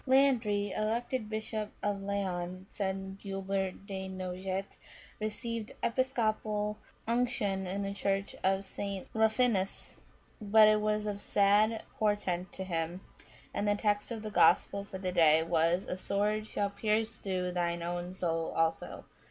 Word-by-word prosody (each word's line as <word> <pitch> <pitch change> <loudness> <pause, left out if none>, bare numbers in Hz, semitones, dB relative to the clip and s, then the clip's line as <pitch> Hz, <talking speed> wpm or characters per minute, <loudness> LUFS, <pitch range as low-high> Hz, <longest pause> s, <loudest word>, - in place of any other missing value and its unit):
" - - -30
Landri, 240 -7 +3
elected 225 +1 -1
bishop 215 -1 -3
of 205 -1 0
Laon," 185 -2 -2
says 190 -2 -1 0.3
Guibert 195 -1 -2
de 190 -2 -5
Nogent, 185 +1 -4 0.2
" - - -20
received 220 +1 -3
episcopal 215 -4 0 0.3
unction 230 -5 0
in 195 +2 -2
the 195 0 -2
Church 195 0 -1
of 195 +1 +2
St. 195 0 -5
Ruffinus; 220 -3 +1 0.4
but 215 +1 +7
it 215 0 +4
was 210 0 +1
of 205 -1 -2
sad 210 +2 +3 0.2
portent 195 -4 0
to 190 - -5
him, 170 0 -2 0.5
that 205 - -1
the 205 0 +3
text 205 0 0
of 225 -2 -5
the 215 - -4
Gospel 200 +2 +4
for 200 -1 -7
the 185 -1 -2
day 160 -2 +5
was, 165 +2 +2
*A - - -4
sword 210 +3 0
shall 200 -2 -1
pierce 220 +2 0
through 185 -2 -2
thine 170 -1 -1
own 175 +1 -3
soul 165 -3 -1
also.'" 165 0 -1
200 Hz, 145 wpm, -32 LUFS, 185-215 Hz, 0.5 s, but